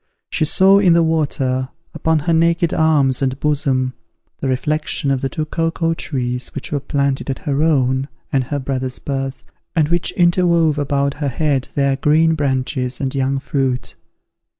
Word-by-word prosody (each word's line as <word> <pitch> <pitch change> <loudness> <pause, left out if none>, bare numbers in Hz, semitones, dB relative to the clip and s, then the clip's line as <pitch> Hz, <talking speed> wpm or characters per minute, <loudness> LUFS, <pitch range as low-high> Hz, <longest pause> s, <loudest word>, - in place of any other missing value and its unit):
She 155 - +1
saw 190 +5 +5
in 185 -4 +5
the 170 0 +4
water, 135 -5 0 0.2
upon 160 0 +1
her 165 +3 0
naked 170 +1 +2
arms 145 -5 +2
and 130 0 -1
bosom, 135 -4 0 0.5
the 135 - -2
reflection 145 +2 -1
of 135 -2 0
the 135 - -1
two 155 +1 -3
cocoa 165 +1 -1
trees 125 -5 -3
which 140 - -5
were 145 - 0
planted 140 0 -1
at 135 - -1
her 140 0 0
own 135 -4 +2 0.3
and 135 -2 +2
her 145 +3 -3
brother's 130 -1 -3
birth, 135 -1 -4 0.3
and 155 -3 +2
which 175 0 0
interwove 170 -3 +3
above 140 -1 0
her 145 - 0
head 140 -1 0
their 140 -1 +1
green 160 +3 +3
branches 130 -3 -1
and 135 -2 -2
young 135 0 0
fruit. 135 -2 -2
140 Hz, 165 wpm, -19 LUFS, 130-160 Hz, 0.5 s, saw